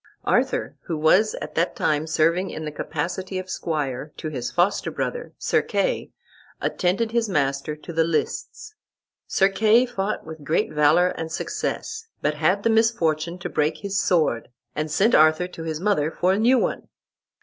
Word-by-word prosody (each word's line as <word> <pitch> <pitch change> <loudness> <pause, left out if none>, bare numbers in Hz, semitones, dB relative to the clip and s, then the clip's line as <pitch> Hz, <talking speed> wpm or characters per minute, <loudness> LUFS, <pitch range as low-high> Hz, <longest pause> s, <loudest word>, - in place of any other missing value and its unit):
Arthur, - - +1
who 165 - -2
was 185 +8 +4
at - - -7
that 170 +2 0
time 155 +1 0
serving 165 +4 +2
in 155 - -6
the 150 - -4
capacity 180 +6 -4
of 185 0 -5
squire 150 -3 -3
to 155 - -4
his 125 -5 -4
foster 180 +4 +1
brother, 485 0 -4
Sir - - +1
Kay, - - -1 0.5
attended 200 +5 0
his 230 -2 +1
master 140 -2 0
to 160 +3 -10
the 165 0 +3
lists. 425 - -3 0.5
Sir 195 - +3
Kay 215 +5 +4
fought 215 -4 -3
with 160 -1 -9
great 155 +2 0
valor 155 +4 +4
and 165 -2 -5
success, 435 - -4
but 150 - 0
had 175 +7 +1
the - - +3
misfortune 175 -7 +1
to 175 - -5
break 150 +1 0
his 195 +4 -2
sword, 155 -10 +1 0.3
and 155 +1 -2
sent 210 +9 +2
Arthur 155 +3 +5
to 165 - -9
his 160 -1 -3
mother 175 -6 +1
for 180 +3 +1
a 195 - 0
new 245 +4 +5
one. - - -1
170 Hz, 170 wpm, -24 LUFS, 155-205 Hz, 0.5 s, Arthur